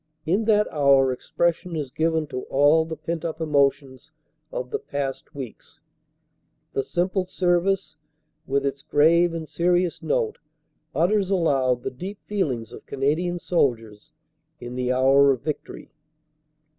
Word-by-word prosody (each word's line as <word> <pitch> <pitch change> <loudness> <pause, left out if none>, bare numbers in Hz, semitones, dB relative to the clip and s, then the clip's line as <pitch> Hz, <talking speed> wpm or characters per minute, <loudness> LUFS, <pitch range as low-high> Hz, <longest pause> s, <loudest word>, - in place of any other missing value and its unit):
In 190 +7 +1
that 210 -1 +3
hour 140 -3 +4
expression 170 +6 -1
is 145 -5 -4
given 160 +2 0
to 130 -3 -5
all 145 +4 +4
the 160 0 -5
pent 165 -1 -4
up 160 -1 -4
emotions 140 -2 0 0.4
of 125 0 -5
the - - -1
past 140 -1 -5
weeks. 130 -5 -9 0.9
The - - +1
simple 185 +7 -1
service 180 0 0 0.5
with 140 +1 0
its 140 0 -2
grave 170 +5 +4
and 165 -1 -5
serious 175 +1 +1
note 470 -4 -1 0.6
utters 190 +3 +2
aloud 135 -9 +1
the - - -3
deep 185 +10 -7
feelings 130 - -2
of - - -12
Canadian 155 +6 0
soldiers 120 - -1 0.5
in 120 0 -7
the 125 0 -1
hour 135 +2 +5
of 135 -2 +1
victory. 150 0 -6
155 Hz, 135 wpm, -24 LUFS, 135-175 Hz, 0.9 s, hour